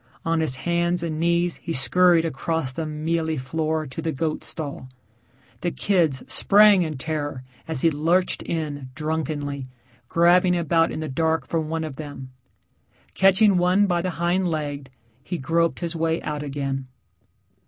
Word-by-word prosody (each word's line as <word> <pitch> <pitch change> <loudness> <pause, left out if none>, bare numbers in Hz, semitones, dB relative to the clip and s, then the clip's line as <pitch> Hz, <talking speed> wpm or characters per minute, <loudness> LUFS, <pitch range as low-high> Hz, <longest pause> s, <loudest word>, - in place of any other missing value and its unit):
On 165 0 +1
his 155 -5 +1
hands 170 +4 0
and 155 -2 -3
knees 170 +1 +1
he 165 - -5
scurried 165 +5 +4
across 160 -2 -2
the 160 +2 -3
mealy 160 +1 -1
floor 155 +3 -2
to 135 +4 -6
the 160 0 -1
goat 155 +1 -2
stall. 140 -4 -6 0.7
The 175 - -1
kids 165 -8 +1
sprang 205 -1 +5
in 155 -4 -2
terror 145 -2 -4 0.2
as 160 -5 +5
he 165 - +4
lurched 170 +5 +1
in 145 -5 -4
drunkenly, 150 -3 -3 0.4
grabbing 180 +1 +4
about 165 0 +2
in - - -4
the 155 - -3
dark 160 +4 0
for 165 - -1
one 160 +1 -3
of 150 -4 -6
them. 145 -4 -8 0.8
Catching 195 - +4
one 180 +3 +3
by 175 -3 +1
the 185 - -2
hind 175 +2 +1
leg, 145 -4 -3 0.3
he 175 - -4
groped 165 +5 0
his 170 -1 -3
way 165 0 0
out 150 -1 -3
again. 135 -2 -3
160 Hz, 155 wpm, -23 LUFS, 145-170 Hz, 0.8 s, sprang